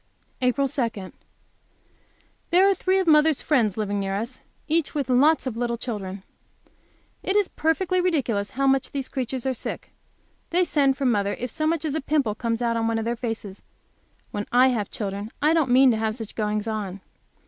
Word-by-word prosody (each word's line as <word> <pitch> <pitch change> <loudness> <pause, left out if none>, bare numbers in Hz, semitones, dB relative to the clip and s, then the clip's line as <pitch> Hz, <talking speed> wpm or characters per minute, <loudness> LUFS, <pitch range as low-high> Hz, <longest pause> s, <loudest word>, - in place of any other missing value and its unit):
APRIL 255 +2 +2
2. 230 -8 -3 1.4
There 370 +3 +5
are 395 - +5
three 375 +1 +1
of 380 - +1
mother's 310 -2 +4
friends 230 -10 +2
living 205 -1 -1
near 195 0 -2
us, 230 +5 -4 0.3
each 320 -1 +1
having 260 -4 +1
lots 310 +1 +4
of 255 -4 -3
little 235 0 -1
children. 200 -5 -5 1.0
It 385 - -1
is 410 -2 +3
perfectly 360 +3 0
ridiculous 245 - 0
how 275 - +2
much 270 -1 +2
those 275 -2 -3
creatures 260 -1 -4
are 265 - +1
sick. 245 - -6 0.6
They 360 +2 +3
send 280 -5 +2
for 275 - -2
mother 205 -5 +1
if 250 -1 -4
so 310 - -1
much 325 0 0
as 300 - -1
a 315 - -1
pimple 275 -6 +1
comes 230 +1 -2
out 230 -1 +1
on 225 0 0
one 230 0 0
of 225 - -2
their 235 +1 -1
faces. 225 -5 -5 0.7
When 205 0 -4
I 250 +2 +5
have 220 -6 -1
children 200 0 -4
I 305 +2 +3
don't 320 -5 +2
mean 255 +1 +6
to 225 - 0
have 220 0 -1
such 225 -3 -7
goings 210 0 -2
on. 200 -3 -4
250 Hz, 190 wpm, -24 LUFS, 215-300 Hz, 1.4 s, mean